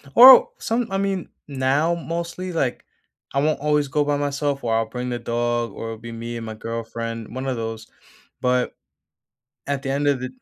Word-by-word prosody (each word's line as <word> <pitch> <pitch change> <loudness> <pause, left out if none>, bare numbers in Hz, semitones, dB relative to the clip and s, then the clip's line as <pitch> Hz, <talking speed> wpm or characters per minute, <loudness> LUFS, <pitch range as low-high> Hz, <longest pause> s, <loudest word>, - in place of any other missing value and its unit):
Oh! 255 +2 +10
Some 230 +1 0
I 195 - 0
mean, 195 -2 -1 0.2
now 140 +4 +1
mostly, 170 +2 -4
like, 135 -7 -1 0.5
I 140 - +2
won't 155 +1 +1
always 150 0 +2
go 145 +2 +1
by 145 0 0
myself 145 -1 -1
or 115 -1 +1
I'll 115 0 +2
bring 125 +2 -5
the 120 -1 -2
dog 120 0 -1
or - - -6
it'll 115 0 -5
be 115 +1 -9
me 115 +1 -5
and 115 - -6
my 110 - -5
girlfriend, 115 0 -5
one 130 +1 -4
of 130 - 0
those, 115 -1 -5 0.5
but, 125 0 +1 0.9
at 140 -1 -2
the 135 - -3
end 140 +2 0
of 140 -3 +2
the 130 - -3
135 Hz, 195 wpm, -23 LUFS, 115-150 Hz, 0.9 s, Oh